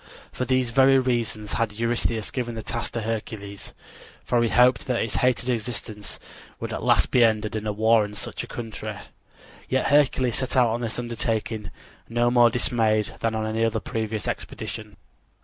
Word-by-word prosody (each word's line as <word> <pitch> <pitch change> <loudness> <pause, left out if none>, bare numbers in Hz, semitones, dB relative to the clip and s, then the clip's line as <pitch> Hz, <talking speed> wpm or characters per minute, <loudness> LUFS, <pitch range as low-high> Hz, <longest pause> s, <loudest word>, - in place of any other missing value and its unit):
For 125 - -3
these 130 -1 +1
very 135 +2 +6
reasons 120 -5 -1
had 115 -2 0
Eurystheus 115 -1 -1
given 120 -3 -3
the 110 - -5
task 115 +1 -3
to 115 - -2
Hercules, 105 -2 -5 0.5
for 120 -1 +2
he 115 - +2
hoped 125 0 +4
that 125 -2 +1
his 115 - -3
hated 125 -1 +1
existence 110 -3 -3 0.4
would - - -4
at - - -4
last - - +3
be 125 - +5
ended 110 -1 +1
in 110 0 -3
a - - +1
war 110 +1 +4
in 105 0 -6
such 105 - -5
a - - -8
country. 110 -2 -6 0.7
Yet 130 0 +1
Hercules 130 -4 +3
set 130 0 -2
out 125 -2 +5
on 120 +2 -2
this 115 -2 -3
undertaking 115 -2 -2 0.4
no 120 +1 +2
more 120 -1 +6
dismayed 110 -3 +1
than 115 -1 0
on 110 0 -1
any 110 +1 +1
previous 110 -1 -3
expedition. - - -5
115 Hz, 175 wpm, -25 LUFS, 110-120 Hz, 0.7 s, very